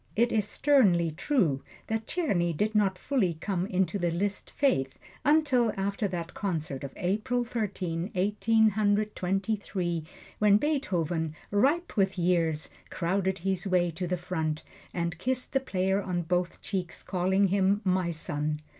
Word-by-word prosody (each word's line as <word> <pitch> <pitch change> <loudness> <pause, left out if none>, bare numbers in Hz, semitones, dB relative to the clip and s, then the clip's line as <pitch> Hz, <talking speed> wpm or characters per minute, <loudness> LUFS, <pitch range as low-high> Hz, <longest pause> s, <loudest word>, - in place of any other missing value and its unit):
It 235 +2 +3
is 210 -2 +1
sternly 200 - +3
true 175 - +1 0.2
that 225 0 -3
Czerny 175 - 0
did 215 +4 +1
not 200 -3 +2
fully 205 - 0
come 185 +2 -2
into 190 0 0
the 175 -1 +1
Liszt 195 +4 -2
faith 135 - +1 0.3
until 285 -6 +3
after 200 +2 -1
that 175 -3 -5
concert 155 -9 -3
of 140 - -5
April 215 +7 0
Thirteenth, 195 -7 -3
Eighteen 210 +3 +3
Hundred 210 +1 +1
Twenty 195 +4 0
three, 175 -5 -3 0.4
when 210 -1 +6
Beethoven, 175 - -1 0.2
ripe 280 +12 +2
with 195 -2 +2
years, 165 -4 +1 0.2
crowded 190 +2 0
his 190 0 0
way 180 -2 +2
to 175 +3 -4
the 180 +1 -1
front 160 -3 -2 0.3
and 170 -1 -3
kissed 255 0 -1
the 270 - +4
player 190 -5 0
on 180 -2 -2
both 180 +1 -1
cheeks, 180 -5 -3
calling 190 +1 +2
him 195 +1 +2
"my 185 -2 +1
son." 150 -2 -2
190 Hz, 150 wpm, -28 LUFS, 170-215 Hz, 0.4 s, when